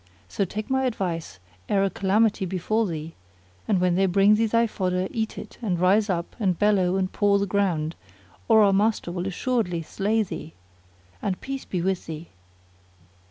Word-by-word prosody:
So 200 - -1
take 215 +4 -5
my 265 0 +2
advice 170 - -3 0.3
ere 195 -1 +3
a 195 - +2
calamity 200 +3 +2
befal 210 +5 0
thee; 160 -1 -5 0.5
and 200 -4 +2
when 180 -1 +2
they 190 +2 +3
bring 195 +3 +5
thee 225 +1 +3
thy 230 +2 +3
fodder 185 -4 -1
eat 220 -1 -3
it - - -9
and 185 -7 -1
rise 200 +4 +3
up 175 -2 -2
and 185 -5 +1
bellow 195 -3 +2
and 190 -1 -1
paw 205 -1 +3
the 200 - 0
ground, 180 -5 0 0.5
or 220 -1 +6
our 200 -1 +4
master 210 -2 +1
will 180 +1 -3
assuredly 195 -4 -1
slay 210 +6 0
thee: 160 -4 -7 0.7
and 190 -2 -2
peace 270 0 -5
be 180 -3 -3
with 190 -1 -1
thee!" 160 +1 -7
195 Hz, 175 wpm, -25 LUFS, 180-215 Hz, 0.7 s, or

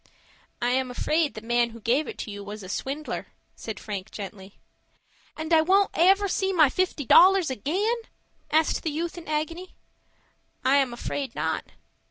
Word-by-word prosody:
"I 245 - +2
am 260 0 0
afraid 305 +5 0
the 215 - -7
man 240 +1 +1
who 230 0 -11
gave 250 +6 +1
it - - -7
to 215 - -8
you 205 0 -7
was 205 +1 -8
a 185 - -9
swindler," 280 +8 -4 0.3
said 220 - -7
Frank, 200 -1 -6
gently. 195 -1 -9 0.8
"And 315 +1 -5 0.2
won't 390 +1 +4
I 340 - +4
ever 390 +1 +4
see 385 0 0
my 310 -7 +5
fifty 360 -6 -1
dollars 370 +1 +6
again?" 370 - 0 0.5
asked 315 +1 +2
the 320 - -2
youth 325 +3 -3
in 345 -1 -10
agony. 315 +4 -3 0.9
"I 270 +2 +5
am 270 -3 +2
afraid 255 +2 -4
not." 160 +1 -2
285 Hz, 170 wpm, -26 LUFS, 230-340 Hz, 0.9 s, dollars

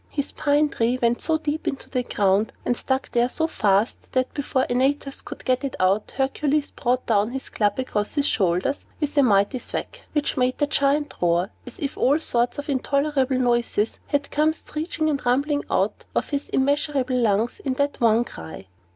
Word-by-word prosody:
His 285 -1 -3
pine 290 +1 +2
tree 240 -1 0
went 235 0 +1
so 320 0 +1
deep 310 0 -3
into 275 - -3
the 255 - -1
ground, 205 -2 +1
and 245 - +1
stuck 265 +2 -2
there 240 +1 +2
so 320 - -1
fast, 210 -7 0
that, 255 0 0
before 275 -2 0
Antaeus 275 +2 0
could - - -10
get 255 +1 +1
it 275 - -3
out, 195 +3 +1
Hercules 285 +2 0
brought 250 -1 -1
down 210 -1 +2
his 265 +2 -6
club 205 -1 0
across 210 -4 -2
his 285 -2 +2
shoulders 190 +7 +1 0.2
with 295 -1 -2
a 285 - +6
mighty 205 0 +3
thwack, - - -6
which 295 -2 0
made 255 0 +1
the 290 - +2
Giant 290 0 +1
roar 175 +3 +2 0.2
as - - -9
if 285 -7 -4
all 280 +4 +4
sorts 240 -6 0
of 285 - -5
intolerable 280 -1 +1
noises 240 -3 +1
had 285 -1 -1
come 305 +1 +2
screeching 315 +1 -3
and 285 -3 -1
rumbling 285 +4 +1
out - - 0
of - - 0
his 285 0 -2
immeasurable 280 -2 +1
lungs 225 0 +1
in 265 -2 -2
that 285 0 -1
one 230 0 +4
cry. 80 - -9
260 Hz, 185 wpm, -24 LUFS, 235-290 Hz, 0.2 s, a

